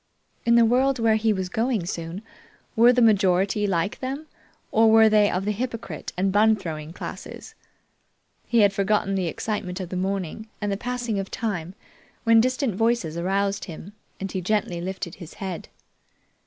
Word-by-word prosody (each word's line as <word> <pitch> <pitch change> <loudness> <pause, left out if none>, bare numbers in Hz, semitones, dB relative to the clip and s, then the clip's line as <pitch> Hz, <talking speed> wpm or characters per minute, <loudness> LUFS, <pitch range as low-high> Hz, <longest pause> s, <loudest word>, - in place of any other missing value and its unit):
In 235 - +5
the 235 -1 +6
world 260 +3 +3
where 225 -2 +3
he 220 0 +2
was 190 -3 -1
going 220 0 -1
soon, 170 +3 -5 0.5
were 235 +2 +7
the 250 -1 +3
majority 200 -1 +3
like 180 +1 -1
them, 270 +4 -4 0.5
or 225 0 +5
were 220 0 +7
they 210 -1 +4
of 185 +2 -2
the 210 - +1
hypocrite 230 +2 -5
and 190 +1 +1
bun 215 +2 +4
throwing 160 -6 -6
classes? 175 - -8 0.9
He 235 -2 +3
had 200 -1 +4
forgotten 200 0 +1
the 190 -2 0
excitement 185 +1 -3
of 185 -3 -5
the 185 - -5
morning 195 +2 -3
and 205 -1 -2
the - - 0
passing 240 -1 -3
of 195 - -4
time 190 -6 -3 0.5
when 230 -1 +6
distant 255 -1 0
voices 225 -6 0
aroused 195 +3 -1
him, 175 +3 -9 0.3
and 195 -1 -4
he 185 - -3
gently 190 -3 -1
lifted 185 -1 -5
his 170 - -10
head. 190 -4 -6
205 Hz, 170 wpm, -24 LUFS, 185-225 Hz, 0.9 s, were